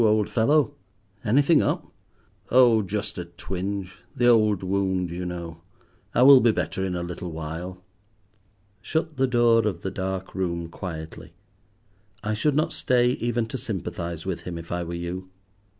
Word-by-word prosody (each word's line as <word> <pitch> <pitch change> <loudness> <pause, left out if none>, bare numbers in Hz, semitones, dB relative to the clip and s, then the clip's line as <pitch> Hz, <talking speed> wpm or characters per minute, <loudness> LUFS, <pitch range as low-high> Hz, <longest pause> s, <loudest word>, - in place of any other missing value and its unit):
old 110 -1 +3
fellow, 140 +6 +2 0.5
anything 145 +8 +4
up?" 160 +4 0 0.6
"Oh, 120 -3 +6
just 100 -1 -3
a 90 - -4
twinge, 95 +2 -5 0.2
the 120 - +1
old 110 -5 +4
wound, 95 -2 0
you 90 +1 -4
know. 85 -2 -6 0.5
I 125 - +5
will 135 0 +10
be 115 -2 +4
better 95 - -2
in 95 -1 -2
a 85 - -2
little 90 0 -5
while." 80 +4 -6 1.0
Shut 160 - -2
the 135 0 +3
door 120 -3 +4
of 90 -5 -3
the 95 - -2
dark 95 0 -4
room 85 -3 -2
quietly. 80 -3 -7 0.9
I 110 0 -1
should 140 +7 +1
not 155 - +1
stay 125 -1 +2
even 120 -2 -1
to 130 - -4
sympathize 85 -5 -4
with 95 -3 -3
him 90 -2 -6
if 85 0 -9
I 85 0 -1
were 85 0 -5
you. 90 +2 -5
95 Hz, 160 wpm, -25 LUFS, 90-120 Hz, 1.0 s, will